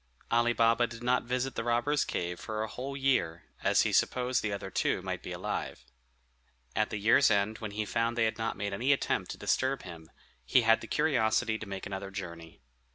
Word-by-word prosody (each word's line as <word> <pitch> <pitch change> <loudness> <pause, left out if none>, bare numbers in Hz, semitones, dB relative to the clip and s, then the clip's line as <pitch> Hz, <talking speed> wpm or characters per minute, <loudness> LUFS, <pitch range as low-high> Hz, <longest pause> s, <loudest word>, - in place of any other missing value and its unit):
Ali 120 +1 +3
Baba 115 +1 +3
did 115 0 -10
not 125 0 +2
visit 125 +2 -1
the - - -3
robbers' 120 +5 +1
cave 90 0 -3
for 110 -1 -3
a - - -3
whole 135 +5 -6
year, 120 -12 +1 0.2
as - - +4
he - - 0
supposed 125 0 +2
the 105 - -2
other 100 -1 -5
two - - 0
might - - -4
be - - -7
alive. 65 - -4 0.9
At 110 - +1
the 105 - -3
year's 110 +6 +5
end, 105 +1 +1
when 110 - -4
he 110 - 0
found 115 +3 -1
they 115 - +3
had 110 0 -2
not 115 0 -2
made 100 0 -3
any 125 +8 +3
attempt 135 - -1
to - - -6
disturb 130 +1 0
him, 80 -3 -10 0.3
he 65 - +3
had 115 0 +4
the 115 - -8
curiosity 110 -5 +1
to 110 - -8
make 95 -1 -5
another 95 0 -5
journey. 85 -6 -8
115 Hz, 210 wpm, -30 LUFS, 100-125 Hz, 0.9 s, year's